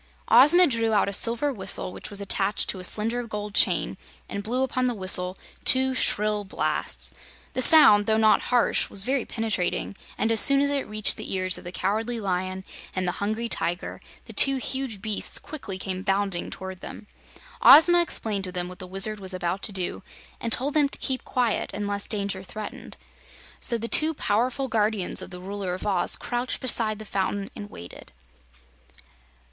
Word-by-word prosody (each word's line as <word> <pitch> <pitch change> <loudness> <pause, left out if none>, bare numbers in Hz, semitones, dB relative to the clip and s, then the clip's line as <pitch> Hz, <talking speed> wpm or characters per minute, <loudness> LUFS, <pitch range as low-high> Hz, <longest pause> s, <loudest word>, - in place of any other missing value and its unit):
Ozma 295 +10 +7
drew 230 -6 0
out 205 - +2
a 200 - -3
silver 235 +7 +1
whistle 190 -3 -1
which - - -9
was 205 - -4
attached 200 0 0
to 190 - -1
a - - -8
slender 230 +5 +1
gold 210 -1 -6
chain - - +3 0.3
and 200 - -5
blew 245 +5 -1
upon 255 -1 -1
the 245 -1 -1
whistle 185 -1 +3 0.3
two 260 0 +4
shrill 210 -4 0
blasts. 190 - -2 0.4
The 255 - -2
sound, 210 -9 +6
though 220 0 +2
not 220 -1 +4
harsh, 245 -1 +1
was 195 - -2
very 260 +1 -1
penetrating, 220 -4 -3 0.2
and 225 - 0
as 225 - +1
soon 275 +4 +5
as 285 0 +1
it 280 -1 -2
reached 215 -1 +1
the - - -6
ears 185 -1 -1
of - - -15
the 175 - -8
Cowardly 220 +6 -2
Lion 185 -1 -3 0.3
and 185 -1 -2
the - - +1
Hungry 220 +3 -2
Tiger, 175 -5 -2 0.2
the - - -12
two 275 0 +7
huge 260 -5 -5
beasts 215 -2 -1
quickly 225 -11 -7
came 185 0 -5
bounding 195 -2 -1
toward 190 -1 -8
them. 210 - -10 0.6
Ozma 345 - +8
explained 215 - -1
to 185 - -3
them 180 -1 -3
what 180 0 -11
the 185 - -9
Wizard 200 +3 +1
was 190 -1 -6
about 180 +1 -3
to - - -2
do, 185 -2 -2 0.4
and 230 - -4
told 275 +5 -1
them 295 -2 +2
to - - -6
keep 260 -1 -4
quiet 245 -4 -1
unless 205 0 -2
danger 200 -2 -2
threatened. 210 +2 -9 0.6
So 235 - 0
the 230 +1 -5
two 310 +6 +5
powerful 250 +4 -1
guardians 215 -4 0
of - - -8
the 180 -1 -10
Ruler 190 -1 -5
of 185 - -8
Oz 190 -4 +1
crouched 245 +1 -4
beside 225 -4 0
the 215 - -10
fountain 195 0 -3
and 205 - -8
waited. 85 - -12
210 Hz, 185 wpm, -25 LUFS, 190-245 Hz, 0.6 s, Ozma